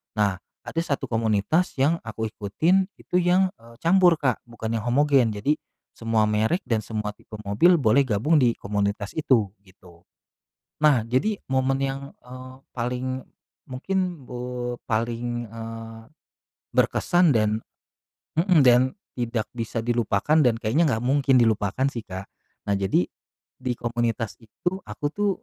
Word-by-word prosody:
Nah, 105 Hz, -3 st, +2 dB, 0.3 s
ada 165 Hz, -, -3 dB
1 140 Hz, -4 st, -2 dB
komunitas 115 Hz, -, +1 dB
yang 155 Hz, +5 st, +3 dB
aku 110 Hz, 0 st, -4 dB
ikutin 165 Hz, -, +1 dB
itu -, -, -7 dB
yang, 180 Hz, +1 st, +3 dB
eee, 115 Hz, 0 st, -16 dB
campur 175 Hz, 0 st, +5 dB
Kak 135 Hz, -6 st, 0 dB
bukan 115 Hz, -1 st, -5 dB
yang 110 Hz, -, -7 dB
homogen 130 Hz, -3 st, +3 dB
jadi 140 Hz, +9 st, +1 dB, 0.4 s
semua 115 Hz, -1 st, 0 dB
merek 110 Hz, -, +1 dB
dan 115 Hz, -3 st, 0 dB
semua 105 Hz, 0 st, -4 dB
tipe 110 Hz, -, -13 dB
mobil 110 Hz, -, +4 dB
boleh 135 Hz, -2 st, +3 dB
gabung 130 Hz, +9 st, +3 dB
di 120 Hz, -3 st, +3 dB
komunitas 100 Hz, 0 st, -2 dB
itu 120 Hz, -10 st, +1 dB
gitu. 90 Hz, -3 st, -20 dB, 0.8 s
Nah, 145 Hz, -5 st, +6 dB
jadi 195 Hz, -, 0 dB
momen 135 Hz, 0 st, +1 dB
yang, 135 Hz, 0 st, -1 dB, 0.2 s
eee, 130 Hz, +1 st, -10 dB, 0.2 s
paling, 125 Hz, +2 st, -3 dB, 0.4 s
mungkin, 175 Hz, +3 st, -2 dB
eee, 125 Hz, 0 st, -4 dB
paling, 120 Hz, +1 st, -2 dB
eee, 115 Hz, 0 st, -8 dB, 0.7 s
berkesan 175 Hz, -5 st, +3 dB
dan 110 Hz, -1 st, +2 dB, 0.8 s
mhm, 170 Hz, -1 st, +4 dB
dan 125 Hz, 0 st, +7 dB, 0.4 s
tidak 115 Hz, -2 st, -1 dB
bisa 115 Hz, -1 st, -3 dB
dilupakan 120 Hz, +4 st, +1 dB
dan 120 Hz, -5 st, +3 dB
kayaknya 125 Hz, +9 st, +2 dB
nggak 115 Hz, -, -5 dB
mungkin 135 Hz, 0 st, +3 dB
dilupakan 110 Hz, 0 st, +2 dB
sih 115 Hz, -, -4 dB
Kak. 95 Hz, 0 st, -7 dB, 0.4 s
Nah -, -, +3 dB
jadi, 95 Hz, -2 st, +1 dB, 0.5 s
di 130 Hz, -1 st, -2 dB
komunitas 115 Hz, -2 st, -2 dB
itu 175 Hz, -, -4 dB
aku 150 Hz, -, -6 dB
tuh 205 Hz, 0 st, +1 dB
120 Hz, 140 wpm, -24 LUFS, 110-140 Hz, 0.8 s, dan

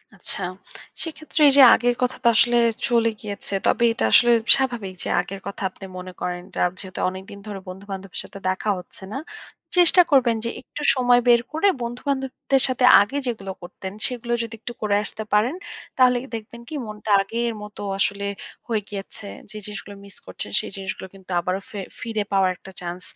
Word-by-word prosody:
আচ্ছা। -, -, -1 dB, 0.6 s
সেক্ষেত্রে 315 Hz, -1 st, -3 dB
এইযে 275 Hz, 0 st, +6 dB
আগের 245 Hz, 0 st, +1 dB
কথা 250 Hz, 0 st, 0 dB
তো -, -, +4 dB
আসলে 240 Hz, +2 st, +4 dB, 0.3 s
চলে 230 Hz, -2 st, +3 dB
গিয়েছে। 200 Hz, -2 st, -6 dB
তবে 235 Hz, -, +2 dB
এটা -, -, -3 dB
আসলে 240 Hz, 0 st, +7 dB, 0.2 s
স্বাভাবিক 240 Hz, -8 st, -2 dB
যে -, -, -3 dB
আগের 195 Hz, 0 st, -8 dB
কথা 200 Hz, -, -7 dB
আপনি 195 Hz, -, -12 dB
মনে 185 Hz, 0 st, -7 dB
করেন, 180 Hz, 0 st, -3 dB, 0.2 s
আর 180 Hz, -, +3 dB
যেহেতু 190 Hz, -2 st, -5 dB
অনেকদিন 190 Hz, +2 st, -9 dB
ধরে 200 Hz, -2 st, -5 dB
বন্ধু-বান্ধবের 190 Hz, 0 st, -6 dB
সাথে 195 Hz, -, -11 dB
দেখা 190 Hz, +3 st, -1 dB
হচ্ছে 180 Hz, +2 st, -12 dB
না। -, -, -3 dB, 0.6 s
চেষ্টা 355 Hz, +1 st, +8 dB
করবেন 245 Hz, -4 st, +4 dB
যে -, -, 0 dB
একটু 295 Hz, -, -9 dB
সময় 245 Hz, -1 st, +4 dB
বের 240 Hz, -1 st, +6 dB
করে 320 Hz, +6 st, +2 dB, 0.2 s
বন্ধু-বান্ধবদের 265 Hz, +2 st, -1 dB
সাথে 255 Hz, -1 st, +2 dB, 0.2 s
আগে 205 Hz, +8 st, -1 dB
যেগুলো 200 Hz, -5 st, -3 dB
করতেন, 190 Hz, +2 st, -8 dB
সেগুলো 240 Hz, -2 st, -3 dB
যদি 230 Hz, -1 st, -7 dB
একটু 240 Hz, -, -7 dB
করে 210 Hz, -2 st, +1 dB
আসতে 220 Hz, +1 st, -6 dB
পারেন, 225 Hz, +9 st, +3 dB, 0.4 s
তাহলে 250 Hz, -1 st, +5 dB, 0.2 s
দেখবেন 230 Hz, +2 st, -8 dB
কি 315 Hz, -, -5 dB
মনটা 210 Hz, 0 st, -5 dB
আগের 230 Hz, +4 st, -2 dB
মতো 210 Hz, 0 st, -9 dB, 0.2 s
আসলে 200 Hz, 0 st, 0 dB, 0.4 s
হয়ে 220 Hz, -3 st, 0 dB
গিয়েছে। 200 Hz, +1 st, -7 dB, 0.2 s
যে 215 Hz, -, -6 dB
জিনিসগুলো 210 Hz, -1 st, -7 dB
মিস 200 Hz, -, -7 dB
করছেন, 95 Hz, +2 st, -7 dB
সেই -, -, -5 dB
জিনিসগুলো 190 Hz, -1 st, -5 dB
কিন্তু 190 Hz, -1 st, -13 dB
আবারও 185 Hz, +3 st, -2 dB
ফে 205 Hz, -, -6 dB, 0.2 s
ফিরে 220 Hz, -2 st, -2 dB
পাওয়ার 190 Hz, -2 st, +3 dB
একটা 190 Hz, -, -13 dB
চান্স 175 Hz, +1 st, -5 dB
215 Hz, 175 wpm, -23 LUFS, 195-245 Hz, 0.6 s, চেষ্টা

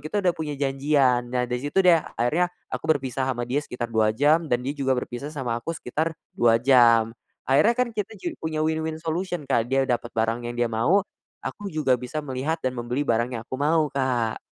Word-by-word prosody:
kita 190 Hz, +8 st, -3 dB
udah 180 Hz, -, +4 dB
punya 155 Hz, -3 st, -5 dB
janjian. 135 Hz, -3 st, +2 dB
Nah, 125 Hz, 0 st, 0 dB
dari 125 Hz, 0 st, -3 dB
situ 145 Hz, +8 st, +1 dB
deh, 170 Hz, -3 st, +6 dB, 0.2 s
akhirnya 155 Hz, +10 st, +2 dB, 0.2 s
aku 160 Hz, -, -4 dB
berpisah 135 Hz, -3 st, 0 dB
sama 120 Hz, -2 st, -1 dB
dia 130 Hz, +4 st, 0 dB
sekitar 120 Hz, -5 st, -6 dB
2 110 Hz, -1 st, +2 dB
jam 155 Hz, +5 st, +3 dB
dan 125 Hz, -1 st, 0 dB
dia 140 Hz, -, -1 dB
juga 135 Hz, -3 st, 0 dB
berpisah 125 Hz, +3 st, -4 dB
sama 125 Hz, -6 st, -3 dB
aku 165 Hz, +7 st, -4 dB
sekitar 155 Hz, +6 st, -2 dB, 0.2 s
2 115 Hz, -1 st, +4 dB
jam. 115 Hz, -3 st, +5 dB, 0.3 s
Akhirnya 150 Hz, -, +4 dB
kan 250 Hz, -1 st, +1 dB
kita 215 Hz, 0 st, -4 dB
juga 335 Hz, -, -4 dB
punya 155 Hz, -1 st, -1 dB
win-win 160 Hz, 0 st, -1 dB
solution, 170 Hz, +1 st, -3 dB
Kak, 125 Hz, -4 st, +1 dB
dia 135 Hz, +1 st, +2 dB
dapet 120 Hz, -2 st, -1 dB
barang 115 Hz, +1 st, +1 dB
yang 120 Hz, -, -6 dB
dia 120 Hz, -1 st, 0 dB
mau, 165 Hz, -, +3 dB, 0.4 s
aku 205 Hz, -1 st, -5 dB
juga 150 Hz, -8 st, +1 dB
bisa 145 Hz, +5 st, -4 dB
melihat 135 Hz, +4 st, -2 dB
dan 130 Hz, -, +1 dB
membeli 120 Hz, +4 st, -1 dB
barang 115 Hz, -2 st, +1 dB
yang 115 Hz, -, -5 dB
aku 130 Hz, -, -5 dB
mau, 155 Hz, 0 st, +2 dB
Kak. 125 Hz, -5 st, 0 dB
135 Hz, 205 wpm, -25 LUFS, 120-160 Hz, 0.4 s, deh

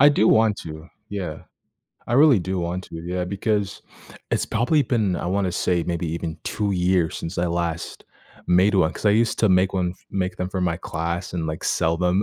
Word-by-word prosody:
I 145 Hz, -, +9 dB
do 110 Hz, -7 st, +3 dB
want 110 Hz, -2 st, +4 dB
to, 80 Hz, 0 st, -8 dB, 0.2 s
yeah, 95 Hz, -7 st, -4 dB, 0.7 s
I 120 Hz, -, 0 dB
really 140 Hz, -3 st, +6 dB
do 95 Hz, +1 st, -2 dB
want 90 Hz, +2 st, -3 dB
to, -, -, -9 dB
yeah, 90 Hz, 0 st, -2 dB
because, 100 Hz, +1 st, -2 dB, 0.5 s
it's -, -, 0 dB
probably 125 Hz, +7 st, +2 dB
been, 110 Hz, -8 st, 0 dB
I -, -, -4 dB
wanna 95 Hz, 0 st, 0 dB
say, 90 Hz, 0 st, +1 dB
maybe 85 Hz, -1 st, -2 dB
even 80 Hz, -1 st, -4 dB
2 105 Hz, -2 st, -1 dB
years 90 Hz, -2 st, +1 dB
since 80 Hz, +3 st, -5 dB
I 90 Hz, -, +1 dB
last 85 Hz, -1 st, -3 dB, 0.4 s
made 95 Hz, +4 st, +4 dB
one, 90 Hz, -3 st, +3 dB
'cause -, -, -4 dB
I -, -, +6 dB
used 115 Hz, +2 st, +2 dB
to 110 Hz, -, +4 dB
make 95 Hz, +1 st, +3 dB
one 90 Hz, -2 st, 0 dB
f -, -, -25 dB
make 95 Hz, -1 st, -2 dB
them 90 Hz, 0 st, -2 dB
for 95 Hz, -1 st, -3 dB
my 85 Hz, -2 st, 0 dB
class 85 Hz, +1 st, -4 dB
and, 85 Hz, -2 st, -2 dB
like, 80 Hz, 0 st, -4 dB
sell 80 Hz, +1 st, +1 dB
them 90 Hz, +3 st, +2 dB
90 Hz, 210 wpm, -23 LUFS, 85-100 Hz, 0.7 s, I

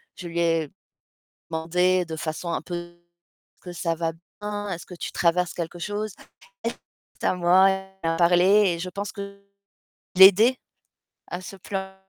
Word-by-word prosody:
je 180 Hz, -, -8 dB
lui 170 Hz, 0 st, -3 dB
ai 165 Hz, -3 st, +1 dB, 0.8 s
demandé 180 Hz, +3 st, +1 dB
de 160 Hz, -1 st, -6 dB
façon 160 Hz, +2 st, -4 dB
un -, -, -1 dB
peu: 175 Hz, -1 st, -7 dB, 0.6 s
«Est-ce -, -, -36 dB
que 180 Hz, -, -8 dB
ça 165 Hz, -1 st, -1 dB
va 165 Hz, 0 st, -1 dB, 0.3 s
bien? 205 Hz, 0 st, -4 dB
Est-ce 175 Hz, -3 st, -5 dB
que 180 Hz, -, -10 dB
tu -, -, -5 dB
traverses 175 Hz, +1 st, +1 dB
quelque 175 Hz, 0 st, -5 dB
chose?» 205 Hz, +3 st, -3 dB, 0.5 s
elle -, -, -1 dB, 0.5 s
c'est -, -, -1 dB
à -, -, +2 dB
moi, 180 Hz, +2 st, +5 dB
elle 190 Hz, 0 st, -4 dB, 0.2 s
a 165 Hz, -, 0 dB
parlé 175 Hz, +1 st, +4 dB, 0.3 s
et -, -, -6 dB
je 185 Hz, -, -4 dB
pense 200 Hz, +2 st, -4 dB
que 200 Hz, 0 st, -8 dB, 0.7 s
l'ai 190 Hz, +1 st, +12 dB
aidée 225 Hz, +7 st, +3 dB, 0.7 s
à 180 Hz, -, -5 dB
se 190 Hz, +2 st, -9 dB
plain 190 Hz, 0 st, -5 dB
180 Hz, 175 wpm, -25 LUFS, 170-190 Hz, 0.8 s, l'ai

